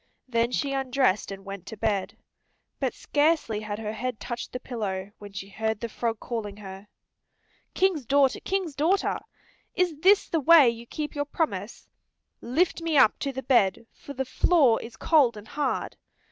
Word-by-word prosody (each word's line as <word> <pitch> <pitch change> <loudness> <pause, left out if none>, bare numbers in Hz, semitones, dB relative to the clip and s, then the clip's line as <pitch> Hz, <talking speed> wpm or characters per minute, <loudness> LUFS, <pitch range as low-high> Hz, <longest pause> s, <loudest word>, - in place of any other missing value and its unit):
Then 235 -1 +1
she 275 +2 -1
undressed 260 -6 +1
and 195 0 -8
went 195 -2 -8
to 220 - -8
bed. 205 -3 -1 0.6
But - - -1
scarcely 290 -7 +1
had 210 -1 -5
her 215 -1 -4
head 245 +1 -4
touched 240 -1 -5
the 250 - -4
pillow 205 -6 -4
when 205 -1 -10
she 195 0 -6
heard 220 +2 -2
the 235 - -4
frog 225 0 -2
calling 210 -4 -5
her. 195 0 -10 0.9
"King's 355 -10 +1
daughter, 275 0 +3
King's 375 -5 -2
daughter! 335 +8 +1 0.6
Is 350 -5 0
this 390 +5 +5
the 330 - 0
way 310 -1 +7
you 235 0 -10
keep 300 +2 -5
your 290 0 -2
promise? 315 +2 -3 0.5
Lift 330 +8 0
me 330 -2 0
up 220 - +5
to 280 - -2
the 265 0 -6
bed, 230 -5 +2
for 285 - -10
the 265 0 -3
floor 260 -3 +3
is 230 -1 -10
cold 270 -8 +3
and 210 +1 -11
hard." 290 -3 -2
245 Hz, 175 wpm, -26 LUFS, 215-295 Hz, 0.9 s, way